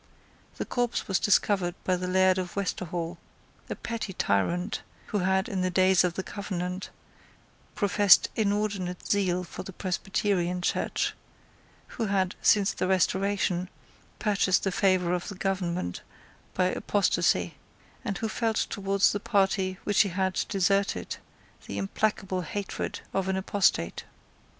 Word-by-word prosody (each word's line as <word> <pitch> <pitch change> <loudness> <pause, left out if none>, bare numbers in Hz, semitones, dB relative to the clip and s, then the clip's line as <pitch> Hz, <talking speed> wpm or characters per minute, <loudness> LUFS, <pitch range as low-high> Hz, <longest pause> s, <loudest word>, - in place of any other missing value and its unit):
The - - -4
corpse 245 -1 -1
was 190 -2 +1
discovered 190 -3 +2
by 185 - +2
the 180 0 -3
Laird 185 0 +4
of 180 -1 -5
Westerhall, 175 -3 -3 0.5
a - - -3
petty 230 -4 -4
tyrant 170 - 0 0.3
who 210 - 0
had, 190 +1 +1
in 190 -2 -2
the 185 - +1
days 185 0 +4
of 175 -1 0
the 190 - -3
Covenant, 185 -2 -4 0.9
professed 205 -2 +5
inordinate 200 -4 -1
zeal 185 -3 +1
for - - -8
the 195 - -8
Presbyterian 185 -1 -1
Church, - - 0 0.7
who 225 - -4
had, 190 -2 +1
since 200 -2 +4
the 185 - -1
Restoration, 190 -1 +1 0.5
purchased 200 -3 +2
the 195 - 0
favour 185 -2 +2
of 180 -1 -2
the 200 - -6
government 180 - -2 0.5
by 185 - +2
apostasy, 200 +1 +1 0.5
and 200 -6 -2
who 225 - -2
felt 225 0 -1
towards 195 -1 +2
the 205 - -2
party 195 -2 +1
which 205 0 +3
he 200 - +2
had 190 +1 0
deserted 195 +1 +1 0.5
the 100 - -5
implacable 185 - -1
hatred 195 +4 -4
of 195 -1 0
an 190 - 0
apostate. 190 - +1
190 Hz, 135 wpm, -28 LUFS, 180-200 Hz, 0.9 s, professed